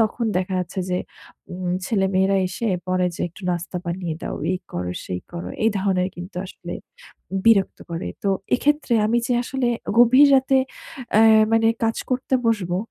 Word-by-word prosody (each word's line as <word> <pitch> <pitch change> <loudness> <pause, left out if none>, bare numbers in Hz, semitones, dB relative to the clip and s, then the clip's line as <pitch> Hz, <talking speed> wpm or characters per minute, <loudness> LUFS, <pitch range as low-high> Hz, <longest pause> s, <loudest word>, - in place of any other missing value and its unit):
তখন 225 +2 +1
দেখা 185 +1 -1
যাচ্ছে 180 +1 -3
যে, 180 - +1 0.5
উম 180 0 -3 0.2
ছেলেমেয়েরা 195 -2 +2
এসে 230 - -4 0.2
পরে 185 0 +1
যে, - - -9
"একটু 175 +4 -16
নাস্তা 175 +1 -3
বানিয়ে 170 -1 -3
দাও। - - -4 0.2
এই 185 - -1
করো, 90 0 -3
সেই 90 -1 -4
করো।" 175 0 -5 0.2
এই 225 - +5
ধরণের 190 -2 +1
কিন্তু 180 +1 -9
আসলে 175 -1 -8 0.7
বিরক্ত 205 -4 +4
করে। 165 - -4
তো 200 - 0 0.3
এক্ষেত্রে 295 -1 +1
আমি 235 +2 +2
যে 250 - 0
আসলে 255 -1 -1 0.3
গভীর 255 +4 +7
রাতে 265 0 +4 0.6
অ্যা 215 - +6 0.3
মানে 225 0 +4 0.2
কাজ 225 0 0
করতে 255 +1 0
বসবো। 190 -6 +1
195 Hz, 165 wpm, -22 LUFS, 180-230 Hz, 0.7 s, গভীর